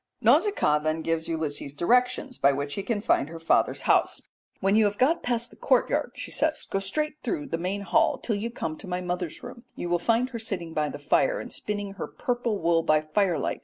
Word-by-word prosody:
Nausicaa 400 - +3
then 155 +1 -1
gives 165 0 -1
Ulysses 150 -3 -3
directions 250 - +1
by 140 - +5
which 140 +1 -3
he 200 - -2
can 210 0 -2
find 145 -8 +2
her 165 - -7
father's 165 - +2
house. - - +2 0.4
"When 195 +1 +2
you 220 0 +5
have 205 0 0
got 300 +7 +3
past 240 -1 -1
the - - -15
courtyard," - - +1
she - - -5
says, - - 0
"go 195 - -1
straight 300 +10 -2
through 295 -6 -3
the 165 - -2
main 190 +4 -2
hall, 200 - +2
till 225 - -2
you 215 +3 -3
come 160 -9 -5
to - - -10
my 180 0 -2
mother's 180 -2 -4
room. 235 - -9
You 175 - -4
will 175 0 +2
find 230 +7 +1
her 235 - -5
sitting 185 -7 -4
by 150 -1 0
the - - -6
fire - - +2
and - - -7
spinning 205 -1 -3
her 200 - -5
purple 240 -3 -2
wool 170 -1 +2
by 155 -1 +3
firelight. 170 +3 0
195 Hz, 220 wpm, -26 LUFS, 165-235 Hz, 0.4 s, by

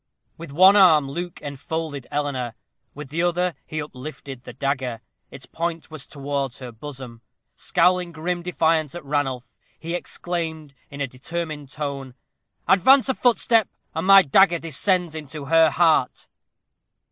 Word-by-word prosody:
With 165 -3 -10
one 185 +7 +7
arm 155 -8 +5
Luke 175 +3 -5
enfolded 145 0 -5
Eleanor, 135 -5 -3 0.4
with 145 -1 -8
the 160 +4 -2
other 175 0 +1
he 155 - -4
uplifted 135 -2 -8
the - - -8
dagger. 130 -4 -2 0.3
Its - - -11
point 165 -1 -4
was 155 -3 -8
towards 140 -3 -4
her 125 -2 -8
bosom. 125 -1 -9 0.3
Scowling 180 0 +1
grim 175 +2 -3
defiance 160 -3 0
at 175 - -8
Ranulph, 135 -3 -2 0.2
he 165 +1 -5
exclaimed, 165 -4 -4 0.2
in 140 0 -8
a 135 - 0
determined 150 +2 -6
tone, 140 -3 -5 0.5
"Advance 260 +8 +5
a - - +3
footstep, 230 -3 +2 0.2
and 160 +4 -3
my 195 -1 +9
dagger 175 +4 +4
descends 170 +2 0
into 150 -1 -7
her 165 +2 +5
heart." 160 -7 +2
155 Hz, 140 wpm, -23 LUFS, 140-175 Hz, 0.5 s, my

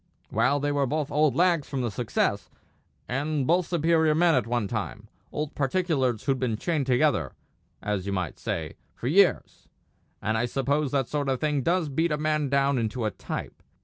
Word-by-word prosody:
"Well, 140 +3 +2
they 145 +1 0
were 140 -1 +1
both 150 +2 -2
old 150 -1 +2
lags 170 -4 +2
from 135 -2 -2
the 120 -3 -1
Success, 95 - -1 0.6
and 140 +2 -1
both 175 +4 +2
superior 160 -2 +2
men 170 +1 +4
at 130 -4 +1
one 120 -3 0
time; 105 0 -4 0.2
old 150 0 -3
particulars 135 - 0
who'd 135 -2 0
been 120 -4 -1
chained 150 0 -1
together, 130 0 +2 0.5
as 100 -2 -2
you - - -1
might 90 -4 -3
say, - - -4 0.2
for - - -9
years; 185 +8 +2 0.5
and 110 +1 -1
I 120 - +1
suppose 140 +3 0
that 135 -2 0
sort 145 -2 -2
of 130 -2 0
thing 150 -2 0
does 170 +3 +1
beat 160 +4 0
a 150 - +1
man 150 -1 0
down 140 -1 +2
into 115 +1 -2
a 110 - 0
type. - - -6
140 Hz, 185 wpm, -26 LUFS, 120-155 Hz, 0.6 s, men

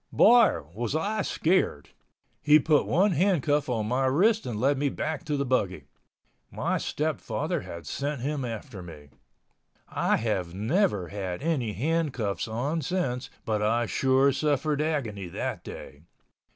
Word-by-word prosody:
Boy, 235 - +5
was 120 +6 -3
I 210 +7 0
scared! 165 - 0 0.5
He 150 +1 +6
put 155 0 +2
one 195 +6 +3
handcuff 155 -5 +1
on 115 -3 -1
my 130 +3 +1
wrist 210 - +2
and 110 -4 -3
led 135 +3 +2
me 145 0 +1
back 155 +1 -3
to 150 -2 -1
the 140 - 0
buggy. 95 - 0 0.7
My - - -1
stepfather - - -2
had 85 -1 -9
sent 140 -2 -3
him 145 +1 -2
after 110 -4 -6
me. 75 -5 -11 0.8
I - - +1
have 95 -6 -2
never 105 - +1
had 95 - -5
any 135 -10 0
handcuffs 135 -8 -1
on 135 +9 -2
since 135 -9 -2 0.2
but 110 -2 0
I 115 +3 +2
sure 135 +3 +3
suffered 150 +1 0
agony 120 - -2
that 85 - -4
day. 70 +1 -10
135 Hz, 145 wpm, -27 LUFS, 105-155 Hz, 0.8 s, He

